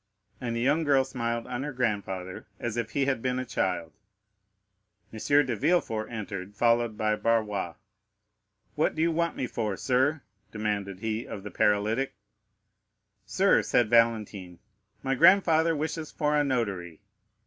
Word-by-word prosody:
And 120 -2 -2
the 115 - -1
young 145 +6 +2
girl 140 -3 +4
smiled 115 -3 -3
on 125 +1 -4
her 145 +2 -3
grandfather, 100 -7 -3
as 120 -2 -3
if 120 -2 -2
he 140 - +1
had 130 -4 0
been 125 0 -1
a 130 - -2
child. 90 -7 -2 1.2
M. 110 - -7
de 145 -1 +2
Villefort 130 -6 0
entered, 100 -3 -6
followed 115 0 +2
by 105 0 +1
Barrois. 105 -6 0 1.0
"What 150 - 0
do 160 - +1
you 170 - +2
want 170 +1 0
me - - -2
for, 110 -5 -3
sir?" 135 +4 +1 0.3
demanded 105 -3 -3
he 110 +1 -3
of 100 - -7
the 105 - -7
paralytic. 105 +8 +1 1.1
"Sir," 190 - +3
said 120 -3 +1
Valentine, 110 -6 +2 0.5
"my 135 - 0
grandfather 165 +1 +5
wishes 155 +1 -3
for 150 -1 0
a 150 - +3
notary." 100 - -2
115 Hz, 150 wpm, -28 LUFS, 105-140 Hz, 1.2 s, grandfather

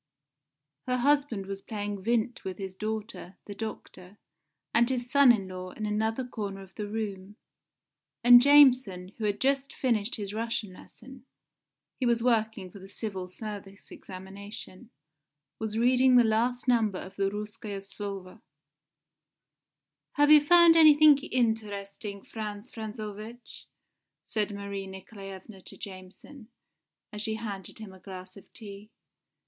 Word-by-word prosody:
Her 250 0 +1
husband 275 -6 +1
was 195 0 -6
playing 205 -3 -5
Vindt 235 +2 0
with 190 -1 -5
his 190 -2 -6
daughter, 215 -2 -5
the 205 - -7
doctor, 205 -3 -8 0.6
and 235 +1 +4
his 245 -1 -3
son 280 -3 +7
in 200 -5 0
law 185 0 -7
in 215 - -5
another 220 +4 -1
corner 200 -5 -5
of 190 -1 -14
the 210 - -5
room. 205 -2 -5 0.9
And 245 0 +9
Jameson, 255 -10 +5
who 215 - -2
had 205 -1 -1
just 275 +1 +1
finished 230 -4 0
his 205 -2 -6
Russian 220 -3 -3
lesson 255 +6 -15 0.7
he 255 - +1
was 235 -1 +2
working 220 -6 0
for 200 - -12
the 190 - -11
Civil 195 -2 -5
Service 200 0 -9
examination 195 +3 -10 0.7
was 220 0 -3
reading 255 +2 +4
the 245 - +7
last 235 +3 0
number 225 -6 +2
of 190 +1 -9
the 195 -1 +1
Rouskoe 210 0 -6
Slovo. 195 0 -8 1.7
"Have 290 0 +4
you 305 -1 +9
found 340 +1 +7
anything 305 -2 +7
interesting, 210 -5 -2
Frantz 215 +1 -7
Frantzovitch?" 220 +1 -8 0.6
said 215 -1 -2
Marie 200 -1 -5
Nikolaevna 190 +1 -10
to - - -13
Jameson, 200 +6 -11 0.7
as 210 - -4
she 220 0 -1
handed 205 -4 -6
him 215 -4 -9
a 190 - -15
glass 185 0 -10
of 200 - -16
tea. 205 -1 -11
215 Hz, 135 wpm, -28 LUFS, 195-240 Hz, 1.7 s, And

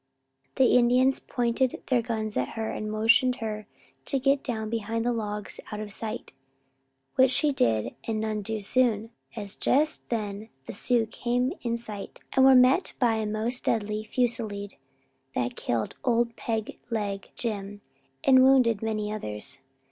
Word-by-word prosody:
The 260 - +4
Indians 250 +2 +4
pointed 240 +1 -1
their 245 -2 +4
guns 220 -2 -3
at 125 - 0
her, 220 0 -2
and 215 0 -4
motioned 230 +4 +4
her 215 -3 -5 0.4
to 275 - +1
get 275 +1 +2
down 220 -4 -3
behind 225 0 -2
the 245 - +2
logs 210 -2 -4
out 210 - -4
of 210 -1 -5
sight, 220 0 -5 0.9
which 260 0 +6
she 295 +3 +2
did 115 - +1
and 220 -1 -1
none 215 -1 -2
too 220 +1 -3
soon, 225 0 +2 0.2
as 205 -3 -4
just 305 +3 +1
then 215 -1 -3 0.2
the - - -7
Sioux 235 +2 +2
came 245 +4 -1
in 235 -1 -1
sight 210 -4 -8
and 265 - +5
were 265 - +8
met 255 +8 +5
by 240 -3 +3
a 215 -1 -1
most 220 +4 -1
deadly 215 -1 0
fusilade 215 -4 -1 0.6
that 120 0 -1
killed 115 -2 -2
Old 235 -1 +1
Peg 225 -3 -3
Leg 205 -4 -3
Jim 205 -3 -4 0.4
and 260 -1 +6
wounded 255 -5 +5
many 215 -1 -2
others. 105 - -3
225 Hz, 155 wpm, -27 LUFS, 210-245 Hz, 0.9 s, were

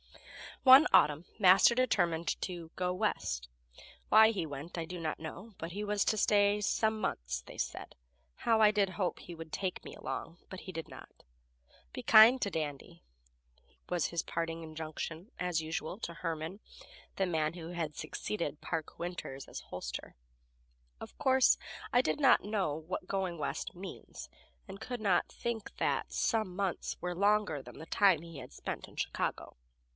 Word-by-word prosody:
One 265 +3 +9
autumn 150 +3 +5
Master 190 +4 +7
determined 175 -10 +1
to 175 -3 -5
"go 180 -1 0
West." 60 - -2 0.6
Why 220 0 +8
he 200 -7 -1
went 145 +5 -7
I 165 - -2
do 180 +2 -7
not 160 -2 -3
know, 190 +7 -8
but 165 +1 -6
he 205 +4 -4
was 210 -1 +1
to 215 - +2
stay 205 0 +4
"some 220 +2 +1
months," - - -2
they - - -12
said. - - -4 0.4
How 225 -1 +2
I 215 - +8
did 205 -2 +2
hope 185 -2 -2
he 175 - -9
would 160 -1 -9
take 185 -2 -3
me - - -9
along, 165 - -5
but 190 - -8
he 185 - -8
did 165 -2 -6
not. - - -13 0.7
"Be - - -6
kind 225 +4 +8
to 200 - 0
Dandy," 150 -4 -5 0.9
was 175 -4 +1
his 170 - -1
parting 165 0 -3
injunction, 160 +4 -6
as 180 -3 0
usual, 160 +4 -4
to 170 -6 -5
Herman, 165 +3 -4 0.6
the 195 - +1
man 155 -2 0
who 165 -1 -8
had 165 -4 -3
succeeded 170 -7 -4
Park 160 -3 -4
Winters 170 -6 -5
as - - -7
hostler. - - -6 0.8
Of - - -10
course, 265 -3 +4 0.4
I 245 - +6
did 255 - -1
not 275 -3 +5
know 200 -8 -1
what 165 +3 -5
going 190 -3 -2
West 145 - -3
means, 190 +2 -9 0.4
and 195 +1 -9
could 245 -2 -5
not 195 -4 +2
think 230 -3 -4
that - - 0
"some 215 -6 0
months" 195 -2 -2
were 180 0 -3
longer 205 -5 +2
than - - -12
the 160 - -9
time 190 -6 +4
he 165 -2 -10
had - - -10
spent - - -6
in - - -17
Chicago. - - -3
180 Hz, 170 wpm, -32 LUFS, 160-210 Hz, 0.9 s, One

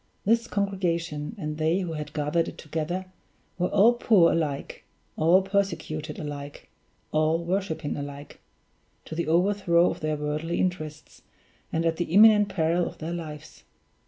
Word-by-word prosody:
This 230 +3 +2
congregation 175 -5 -2
and 150 -4 -5
they 160 +4 +2
who 175 -3 -4
had 150 -1 -5
gathered 155 +3 0
it - - -8
together, 165 +4 -3 0.5
were 180 - +2
all 225 +5 +5
poor 215 -7 +4
alike, 150 -4 -2 0.3
all 175 +4 +4
persecuted 190 -6 -2
alike, 145 -1 -7 0.4
all 155 +1 +2
worshiping 170 -4 -2
alike, 145 0 -8 0.7
to - - -8
the 170 0 -2
overthrow 175 0 +3
of - - -7
their 155 0 -1
worldly 150 +3 -2
interests, 155 -4 -4 0.5
and 165 +1 0
at 165 -1 +1
the 175 - -1
imminent 210 +2 +6
peril 170 0 +1
of - - -9
their 165 +2 -5
lives. 155 -3 -8
165 Hz, 145 wpm, -26 LUFS, 155-185 Hz, 0.7 s, imminent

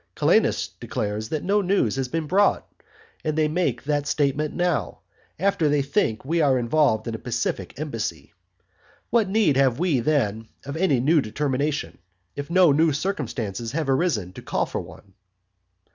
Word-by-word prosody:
Calenus - - +2
declares 105 +1 -3
that 155 - -2
no 205 +2 +2
news 185 - +1
has 135 -1 -1
been 160 +4 -2
brought. 195 +6 +2 0.6
And 155 0 -2
they 155 -1 +3
make 170 +4 -1
that 145 0 -1
statement 150 0 0
now, 175 -2 -1 0.4
after 175 -4 +1
they 145 -1 +2
think 135 - 0
that - - -14
we 165 +2 +1
are 135 -3 +3
involved 120 -3 +1
in 115 - -3
a 110 - -5
pacific 120 -6 -3
embassy. 130 -8 -4 0.8
What 220 -4 +3
need 195 -9 +3
have 130 -3 +3
we, 165 -6 +1
then, 115 -5 0 0.2
of 140 - -5
any 160 -6 +2
new 150 +5 +3
determination, 140 +5 -2 0.4
if 145 +1 -5
no 180 -2 +5
new 155 +2 +3
circumstances 120 - -3
have 150 -3 0
arisen 130 - 0
to - - -9
call - - -1
for - - -4
one? 95 - -14
145 Hz, 165 wpm, -24 LUFS, 120-165 Hz, 0.8 s, no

